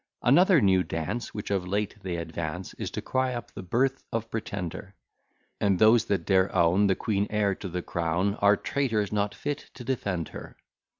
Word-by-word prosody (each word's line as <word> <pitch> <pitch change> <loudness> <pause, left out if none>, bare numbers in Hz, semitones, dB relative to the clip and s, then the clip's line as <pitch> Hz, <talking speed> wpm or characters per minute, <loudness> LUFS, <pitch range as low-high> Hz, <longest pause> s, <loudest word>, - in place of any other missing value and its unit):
Another 175 +6 +6
new 95 -3 +4
dance, 90 +8 -3
Which 105 -1 -6
of 95 -2 0
late 105 +2 -1
they 90 -3 -3
advance, 85 +1 -5
Is - - -5
to - - -5
cry 130 -1 0
up 120 - -7
the - - -8
birth 130 +9 0
of 115 0 -3
Pretender, 100 -3 -5 0.6
And 100 -2 +2
those 110 +4 +5
that 100 - -1
dare 95 -1 +3
own 90 +3 +4
The 95 - +3
queen 105 0 -1
heir 105 -2 +1
to 95 0 -7
the 90 0 -4
crown, 85 +4 0
Are 100 0 +5
traitors, 110 -7 -1
not 105 -1 0
fit 145 +1 -4
to 125 - -8
defend 100 - -2
her. - - -10
100 Hz, 185 wpm, -27 LUFS, 90-115 Hz, 0.6 s, Another